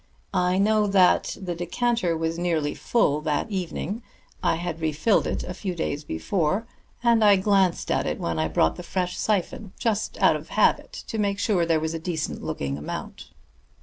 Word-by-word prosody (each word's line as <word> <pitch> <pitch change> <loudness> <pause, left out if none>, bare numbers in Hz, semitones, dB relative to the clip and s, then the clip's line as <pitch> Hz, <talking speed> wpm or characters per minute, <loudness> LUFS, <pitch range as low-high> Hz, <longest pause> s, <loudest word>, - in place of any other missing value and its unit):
I 180 0 +2
know 210 +1 +3
that 190 -2 +3
the 180 -2 -3
decanter 175 +1 0
was 165 +1 -2
nearly 165 -4 0
full 150 -11 +1
that 155 +7 -1
evening; 190 +3 -3 0.4
I - - +2
had 165 -1 -4
refilled 160 +7 +2
it - - -2
a 180 - -5
few 185 -1 -4
days 150 -3 -2
before, 160 - -1 0.4
and 235 -2 +4
I 205 -1 +7
glanced 190 -2 +2
at - - +1
it - - -2
when 85 -1 -2
I 80 - +1
brought 80 0 +1
the - - -6
fresh 180 0 -2
syphon, 205 0 -1
just 220 -2 -1
out - - +5
of - - -7
habit, - - +2
to 225 - -4
make 200 -1 +1
sure 195 -5 +1
there 165 -1 +3
was 160 +1 -2
a 165 - -3
decent 160 -1 -3
looking 70 0 -3
amount." 75 - -7
180 Hz, 180 wpm, -25 LUFS, 160-200 Hz, 0.4 s, I